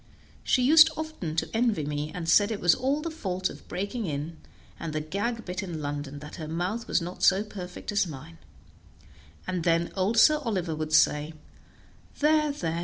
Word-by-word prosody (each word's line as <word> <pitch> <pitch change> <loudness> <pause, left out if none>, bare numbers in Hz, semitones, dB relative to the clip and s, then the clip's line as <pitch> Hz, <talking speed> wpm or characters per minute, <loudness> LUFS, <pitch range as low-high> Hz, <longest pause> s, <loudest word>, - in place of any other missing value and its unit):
She 255 - +2
used 315 +4 +8
often 310 - -5
to 160 - -1
envy 225 -9 +1
me, 150 +1 -3
and 165 -1 -6
said 205 +5 +5
it 215 -3 -3
was 175 -1 +5
all 275 +4 -1
the 330 - -3
fault 185 - -2
of - - -14
breaking 200 +4 -3
in, 155 +2 -4 0.4
and 165 -2 -5
the 155 - -1
gag 205 +9 -3
bit 180 +1 -4
in 175 -5 -5
London, 145 -1 -4
that 150 - -9
her 155 - -6
mouth 180 +8 -3
was 170 - +1
not 180 +2 -7
so 195 +2 +4
perfect 185 -4 -7
as 200 -2 +1
mine; 155 +2 -10 1.1
and 185 -2 -2
then 170 0 +1
old 200 +4 0
Sir 305 +6 +6
Oliver 190 - -2
would 155 0 -4
say, 150 0 +3 0.8
"There, 300 0 +3
there! 165 - -3
180 Hz, 185 wpm, -27 LUFS, 160-230 Hz, 1.1 s, used